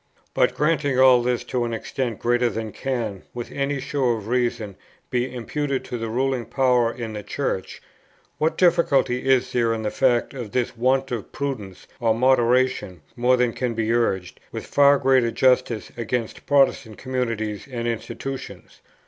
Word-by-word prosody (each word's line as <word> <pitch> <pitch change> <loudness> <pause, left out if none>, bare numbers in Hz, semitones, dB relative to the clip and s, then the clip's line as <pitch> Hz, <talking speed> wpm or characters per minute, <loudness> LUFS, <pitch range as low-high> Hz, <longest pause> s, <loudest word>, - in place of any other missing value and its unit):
But - - +2
granting 150 -3 +1
all 130 -2 +7
this 120 0 -1
to 125 0 -2
an 115 -1 -2
extent 120 -1 -3
greater 120 0 +1
than 110 0 -4
can 115 -8 -3
with 120 -1 -6
any 140 0 -1
show 135 -2 0
of 110 -2 -6
reason 120 -5 -1 0.4
be 125 +1 0
imputed 135 +3 -3
to 120 - -5
the 115 0 -3
ruling 125 0 -1
power 125 -2 +2
in 115 -2 -6
the 105 - -5
Church, - - -4 0.6
what 155 +1 +1
difficulty 155 -8 +3
is 130 -2 +3
there 115 -2 +2
in 110 - -5
the 105 - -1
fact 125 -2 +1
of 120 -7 -7
this 125 0 -1
want 130 +3 +1
of 115 -4 -4
prudence 115 -10 -5
or 115 -3 +2
moderation 125 -6 +2
more 125 +1 +3
than 125 -2 +1
can 125 -3 -2
be 115 0 0
urged, 95 -6 -1
with - - -6
far 140 0 +5
greater 130 -3 +3
justice, 125 -2 +1
against 115 0 -4
Protestant 135 -6 +2
communities 115 -5 -3
and 120 -1 -3
institutions? 120 +4 -6
125 Hz, 165 wpm, -23 LUFS, 115-130 Hz, 0.6 s, all